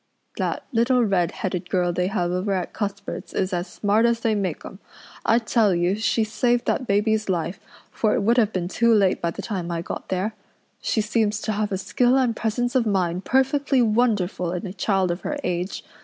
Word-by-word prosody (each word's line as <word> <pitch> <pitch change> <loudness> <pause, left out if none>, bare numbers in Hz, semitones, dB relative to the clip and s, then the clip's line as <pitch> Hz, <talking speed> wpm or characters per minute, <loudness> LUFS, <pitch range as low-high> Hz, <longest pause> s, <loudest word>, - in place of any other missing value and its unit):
"That - - -2
little 245 +1 +3
redheaded 180 -1 -1
girl 180 -2 +1
they 180 +1 0
have 180 -3 -1
over 185 +3 -1
at 185 -2 -3
Cuthbert's 200 -1 -5
is 185 0 0
as 175 +1 -1
smart 215 +3 +2
as 235 0 0
they 225 -1 +1
make 190 -6 -2
'em. 195 - -10 0.5
I 230 - +5
tell 225 -4 +2
you 175 +2 +1
she 220 +1 +1
saved 235 +3 +1
that 255 - -1
baby's 215 +1 +1
life, 175 0 -1 0.3
for 215 -2 +1
it - - 0
would 235 +4 +3
have 220 -3 +3
been 180 -3 -2
too 235 +5 +2
late 195 -3 +2
by 170 - 0
the - - -6
time 185 -5 -3
I 170 -1 -2
got - - -6
there. 190 +4 -1 0.5
She 220 - 0
seems 210 -1 0
to 220 - -2
have 210 0 -1
a 190 - 0
skill 245 +6 +2
and 250 -4 +2
presence 240 +3 -1
of 250 -4 +2
mind 185 -3 0
perfectly 270 0 +2
wonderful 210 -6 +1
in 180 +2 -4
a 185 - -5
child 195 -2 +1
of 175 - -4
her 295 - -3
age. 180 +1 -2
205 Hz, 205 wpm, -23 LUFS, 180-230 Hz, 0.5 s, I